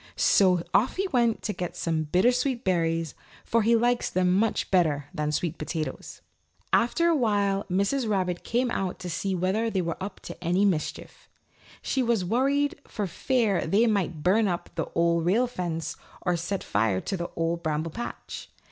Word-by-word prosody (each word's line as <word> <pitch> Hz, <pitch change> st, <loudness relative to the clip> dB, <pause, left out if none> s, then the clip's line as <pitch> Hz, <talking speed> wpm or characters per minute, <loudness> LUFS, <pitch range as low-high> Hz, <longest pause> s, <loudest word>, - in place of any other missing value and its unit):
So 180 Hz, -3 st, +4 dB
off 230 Hz, -, +3 dB
he 390 Hz, +1 st, 0 dB
went 235 Hz, -6 st, +1 dB
to 210 Hz, -, -2 dB
get 180 Hz, -2 st, -5 dB
some 160 Hz, -2 st, -1 dB
bittersweet 245 Hz, -, +2 dB
berries, 165 Hz, -3 st, 0 dB, 0.3 s
for 230 Hz, -, +2 dB
he 230 Hz, +2 st, +4 dB
likes 240 Hz, +1 st, +2 dB
them 180 Hz, 0 st, +2 dB
much 210 Hz, +3 st, +1 dB
better 155 Hz, -6 st, +2 dB
than 150 Hz, -3 st, -1 dB
sweet 160 Hz, +1 st, -2 dB
potatoes. 155 Hz, 0 st, -5 dB, 0.5 s
After 245 Hz, +9 st, +3 dB
a 335 Hz, -, +3 dB
while 205 Hz, -6 st, +1 dB
Mrs. 200 Hz, +7 st, +1 dB
Rabbit 185 Hz, -4 st, -1 dB
came 245 Hz, +1 st, 0 dB
out 190 Hz, -5 st, -2 dB
to 180 Hz, -1 st, -6 dB
see 190 Hz, +3 st, -1 dB
whether 190 Hz, +6 st, 0 dB
they 190 Hz, -4 st, 0 dB
were 165 Hz, +2 st, -4 dB
up 190 Hz, 0 st, -5 dB
to 180 Hz, -, -9 dB
any 180 Hz, +4 st, +2 dB
mischief. 175 Hz, -6 st, -3 dB, 0.5 s
She 265 Hz, -, 0 dB
was 230 Hz, -6 st, +1 dB
worried 275 Hz, +8 st, +1 dB
for 210 Hz, -, -3 dB
fear 215 Hz, -, 0 dB
they 215 Hz, +4 st, +4 dB
might 190 Hz, -8 st, 0 dB
burn 210 Hz, +4 st, +3 dB
up 175 Hz, -2 st, -3 dB
the -, -, -2 dB
Old 170 Hz, 0 st, +2 dB
Rail 205 Hz, +9 st, +3 dB
Fence 175 Hz, -9 st, -4 dB, 0.3 s
or 180 Hz, -1 st, +1 dB
set 175 Hz, +3 st, -3 dB
fire 105 Hz, -2 st, +1 dB
to -, -, -3 dB
the 175 Hz, -2 st, -4 dB
Old 165 Hz, +1 st, -1 dB
Bramble 155 Hz, 0 st, -2 dB
Patch. 240 Hz, +8 st, -7 dB
190 Hz, 175 wpm, -27 LUFS, 170-230 Hz, 0.5 s, So